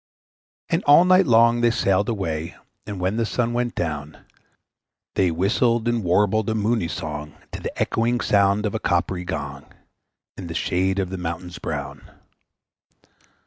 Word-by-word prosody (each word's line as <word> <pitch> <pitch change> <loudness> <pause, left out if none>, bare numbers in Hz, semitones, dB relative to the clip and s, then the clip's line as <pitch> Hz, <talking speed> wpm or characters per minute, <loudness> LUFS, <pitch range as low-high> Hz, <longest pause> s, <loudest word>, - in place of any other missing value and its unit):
And 170 +1 0
all 145 +5 +7
night 185 -1 +5
long 115 0 +5
they 120 - +4
sailed 100 -3 +1
away; 85 -7 -3 0.3
And 100 -3 -5
when 95 +4 -1
the 115 - +1
sun 120 0 -1
went 120 0 -1
down, 75 -3 -4 0.9
They 95 - +2
whistled 110 +7 +1
and 120 -2 0
warbled 105 +4 +2
a 110 - 0
moony 110 -3 0
song 75 -2 -6 0.2
To - - -7
the - - -6
echoing 120 +2 +1
sound 100 -1 +2
of 105 - -2
a 110 - -2
coppery 90 0 -1
gong, - - -6 0.7
In 95 - -7
the 85 - -6
shade 95 +3 0
of 95 -2 -1
the 95 - -4
mountains 90 +1 -5
brown. 70 -2 -6
100 Hz, 155 wpm, -23 LUFS, 85-115 Hz, 0.9 s, all